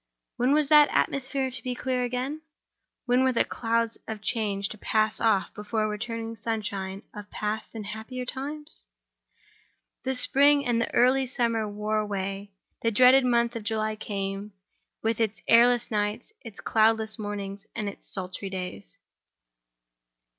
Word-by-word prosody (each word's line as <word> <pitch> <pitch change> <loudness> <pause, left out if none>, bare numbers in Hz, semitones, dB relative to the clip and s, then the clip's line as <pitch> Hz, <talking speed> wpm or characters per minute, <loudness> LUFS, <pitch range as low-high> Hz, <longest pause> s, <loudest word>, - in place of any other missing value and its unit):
When 250 +3 +2
was 300 -1 +2
that 300 -1 +7
atmosphere 265 -1 0
to 255 +1 -3
be 250 0 -3
clear 255 0 -1
again? 255 +5 -3 0.6
When 250 +1 +3
were 260 - +3
the 235 - +3
clouds 230 0 -1
of 220 -1 -4
change 205 -2 -1
to 215 - -8
pass 215 0 +1
off 220 -4 +2
before 210 +1 -3
the 215 - +1
returning 225 +1 -4
sunshine 205 -3 -4
of 210 -1 -9
past 215 +2 -4
and 215 -2 -5
happier 220 +5 -6
times? 285 - -6 1.2
The 265 0 -1
spring 280 +3 +4
and 235 -1 +1
the - - -2
early 260 +2 +4
summer 230 -3 0
wore 210 +1 -1
away. 200 -1 -3 0.3
The 230 - +2
dreaded 255 +4 +6
month 235 -1 +2
of 230 - -3
July 215 0 -1
came, 200 -1 -4 0.5
with 225 0 0
its 220 -1 -1
airless 240 +1 +5
nights, 210 - -2
its 225 -5 -10
cloudless 220 0 +2
mornings, 205 -1 -5
and 215 -3 -2
its 200 - -8
sultry 190 +1 -4
days. 180 - -7
225 Hz, 150 wpm, -27 LUFS, 210-250 Hz, 1.2 s, that